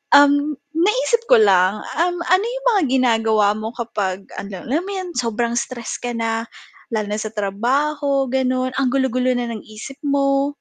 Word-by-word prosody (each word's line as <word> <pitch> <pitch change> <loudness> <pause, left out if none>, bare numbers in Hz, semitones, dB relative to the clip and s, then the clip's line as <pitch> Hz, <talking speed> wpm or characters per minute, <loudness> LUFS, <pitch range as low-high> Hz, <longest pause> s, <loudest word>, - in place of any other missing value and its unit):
um, 285 +1 +5 0.3
naisip 470 +2 +1
ko 230 - +6
lang, 195 0 +4 0.2
um, 350 +2 +1
ano 370 +5 +2
yung - - -5
mga 415 -5 +3
ginagawa 225 -4 +2
mo 220 +1 -5
kapag 205 -6 -3 0.2
ano, 195 -2 -6
alam 315 +7 0
mo 400 - -5
yun, 370 -2 -4
sobrang 235 0 -1
stress 235 -1 -4
ka 245 0 -4
na, 225 0 -2 0.5
lalo 210 -2 -1
na 210 - -2
sa 215 0 -5
trabaho, 270 +7 0
ganon 255 0 0
ang 265 -1 +1
gulo-gulo 255 -1 +1
na 245 -1 -2
ng 220 -2 -7
isip 220 +5 -10
mo? 275 0 +1
250 Hz, 170 wpm, -20 LUFS, 220-285 Hz, 0.5 s, ko